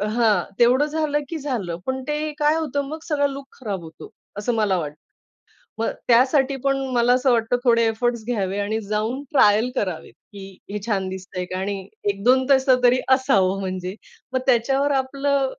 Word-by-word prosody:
हां. 215 -6 +3 0.2
तेवढं 250 +5 +5
झालं 305 -1 -1
की 330 - -3
झालं. 230 - -3
पण 260 0 -2
ते 300 +1 -2
काय 300 +1 +3
होतं 285 -3 -2
मग 315 +2 -6
सगळा 285 -2 +1
लूक 275 0 -8
खराब 200 -8 -4
होतो 160 0 -11 0.3
असं 220 +4 -1
मला 205 -4 +1
वाटतं. 150 -3 -4 0.8
मग 225 - 0 0.2
त्यासाठी 265 +3 +4
पण 275 0 +2 0.2
मला 240 +1 +3
असं 255 +1 +3
वाटतं 230 +1 +1
थोडे 230 -1 +4
एफर्ट्स 235 0 -1
घ्यावे 200 -5 -1
आणि 215 +2 -1
जाऊन 220 +6 -1
ट्रायल 220 -1 +4
करावेत. 180 -8 -3 0.2
की 195 -1 -11
हे 210 - -3
छान 195 -4 -1
दिसतंय 185 -1 -6
का? 185 +1 -5
आणि 195 0 -4 0.2
1-2 250 +6 +2
तसं 260 -2 +4
तरी 250 +1 +5 0.2
असावं 195 -8 +1
म्हणजे. 185 0 -4 0.4
मग 260 - 0
त्याच्यावर 270 +3 +2
आपलं 275 0 -1
240 Hz, 170 wpm, -22 LUFS, 200-270 Hz, 0.8 s, तेवढं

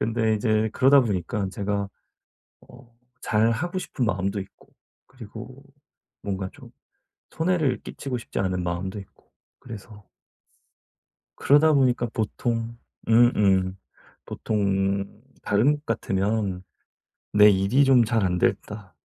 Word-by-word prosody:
근데 110 -1 +1
이제 110 0 +1
그러다보니까 105 - +2
제가 100 0 -3 0.8
어 120 -1 -17 0.3
잘 110 +1 +2
하고 175 +10 -2
싶은 130 -8 -3
마음도 100 -1 -1
있고 95 - -12 0.4
그리고 125 +2 -11 0.6
뭔가 95 -1 -3
좀 - - -14 0.6
손해를 160 -4 0
끼치고 135 -3 -5
싶지 - - -6
않은 90 -2 -1
마음도 90 +3 -3
있고 95 - -18 0.3
그래서 105 -3 -11 1.3
그러다 150 +3 +4
보니까 125 -4 +2
보통 115 +1 -2 0.3
음음. 100 -5 +3 0.5
보통은 100 0 -2 0.2
다른 120 +8 +3
곳 145 - -19
같으면 100 -3 -1 0.7
'내 105 0 +7
일이 100 +8 +3
좀 130 -3 +5
잘 115 -1 0
안 90 -1 0
됐다' 100 +1 -2
110 Hz, 235 characters per minute, -24 LUFS, 100-120 Hz, 1.3 s, 내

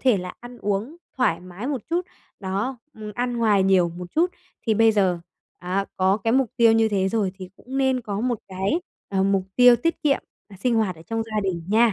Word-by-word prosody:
thể 255 -6 +4
là 180 0 -6
ăn 245 0 -11
uống 210 +10 -2 0.2
thoải 205 -10 +2
mái 185 +6 -8
một 275 -6 -2
chút, 350 +2 0 0.3
đó, 200 +7 -2 0.2
ừm, 215 -1 -8
ăn 245 +1 -1
ngoài 210 -4 +3
nhiều 190 -2 +4
một 175 +1 -8
chút 345 +3 +2 0.4
thì 220 - +3
bây 225 +1 +5
giờ, 190 -4 +2 0.4
à, 185 +2 -1
có 190 +1 +3
cái 225 +2 -1
mục 260 -3 +2
tiêu 230 -1 +6
như 225 0 +4
thế 195 -2 +1
rồi 200 -3 0
thì 185 -1 -8
cũng 265 +2 -6
nên 265 -1 +2
có 205 -3 -4
một 245 -2 0
cái, 195 - -1 0.3
ờ, 190 -1 +1
mục 195 -1 +2
tiêu 245 -1 +8
tiết 330 +5 -1
kiệm 285 -2 +2 0.3
là 195 - -13
sinh 240 +4 0
hoạt 205 -6 +1
ở 160 - -13
trong 225 +6 -2
gia 215 -1 -2
đình 180 -3 -2
nha. 225 +1 +4
215 Hz, 225 wpm, -24 LUFS, 190-245 Hz, 0.4 s, tiêu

